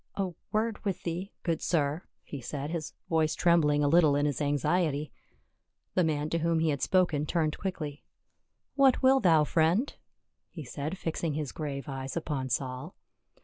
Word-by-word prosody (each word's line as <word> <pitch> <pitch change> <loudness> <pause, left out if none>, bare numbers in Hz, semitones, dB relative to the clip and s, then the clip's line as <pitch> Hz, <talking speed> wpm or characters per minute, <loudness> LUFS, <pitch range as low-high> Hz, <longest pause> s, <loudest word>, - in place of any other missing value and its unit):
" - - -50
A 185 - -5 0.2
word 220 0 -1
with 190 -4 -2
thee, 180 +4 -4
good 165 -3 -1
sir," 150 -1 0 0.2
he 140 - -7
said, 145 +4 -5
his 165 -3 -4
voice 160 -1 +1
trembling 150 -4 +3
a - - +3
little 155 -2 +5
in 145 +1 +2
his 145 0 -1
anxiety. 150 +1 0 0.8
The 180 - +3
man 150 -2 0
to 170 - +1
whom 165 0 +1
he 160 0 +2
had 140 -3 -1
spoken 160 -5 +2
turned 155 -2 0
quickh'. 155 -6 -4 0.7
"What 270 -3 +4
will 265 +1 +6
thou, 165 -8 +5
friend?" 170 - +2 0.6
he 160 - -8
said, 145 +7 -5
fi.xing 165 -2 -2
his 150 -4 -3
grave 140 -3 -5
eyes 135 +1 -5
upon 145 -5 -3
Saul. 130 +5 -3
155 Hz, 170 wpm, -29 LUFS, 145-175 Hz, 0.8 s, will